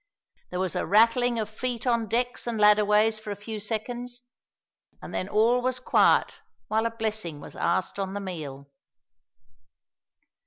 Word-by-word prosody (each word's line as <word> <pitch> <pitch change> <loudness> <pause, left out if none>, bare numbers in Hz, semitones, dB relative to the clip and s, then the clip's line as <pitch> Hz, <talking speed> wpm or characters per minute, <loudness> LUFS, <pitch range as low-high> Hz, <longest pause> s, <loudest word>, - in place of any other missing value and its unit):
There 180 - -4
was 185 -3 -2
a - - 0
rattling 230 +5 +4
of 215 -2 -1
feet 240 +2 -4
on 235 -2 +1
decks 245 +2 -1
and 230 -2 -2
ladderways 210 +1 +4
for 215 - -9
a 205 - -3
few 215 +2 -7
seconds, 240 +3 -4 0.8
and - - -10
then 185 - -3
all 230 +4 +3
was 255 0 -1
quiet 255 - +3 0.3
while 220 +1 +1
a - - -2
blessing 220 -8 -3
was - - -11
asked 180 +3 -1
on 195 0 -3
the - - -2
meal. 150 -8 -7
220 Hz, 155 wpm, -26 LUFS, 200-235 Hz, 0.8 s, rattling